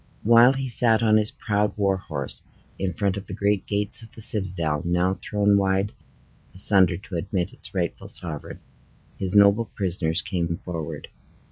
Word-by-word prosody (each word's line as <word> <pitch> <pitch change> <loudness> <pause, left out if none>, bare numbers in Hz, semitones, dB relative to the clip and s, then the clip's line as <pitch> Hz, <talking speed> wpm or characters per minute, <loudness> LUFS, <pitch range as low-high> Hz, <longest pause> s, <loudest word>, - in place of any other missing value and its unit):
While 120 +3 +7
he 135 0 -3
sat 115 -2 +3
on 110 -1 +5
his 105 0 +1
proud 105 -2 -1
war 100 -2 +2
horse, 75 -7 -3 0.4
in 95 -1 -1
front 100 -1 -1
of 100 0 -7
the 95 - -6
great 100 -1 0
gates 105 +2 0
of 115 - -13
the 110 - -11
citadel, 95 -8 -2
now 90 +2 0
thrown 100 -1 +2
wide 95 +1 +1 0.6
asunder 95 -3 +4
to 100 -3 -6
admit 90 +4 -2
its 130 - -11
rightful 85 -3 -2
sovereign, 75 -4 -7 0.6
his 95 0 -2
noble 100 +3 +6
prisoners 90 -5 -1
came 85 -2 -2
forward. 85 -4 -5
100 Hz, 160 wpm, -24 LUFS, 90-105 Hz, 0.6 s, While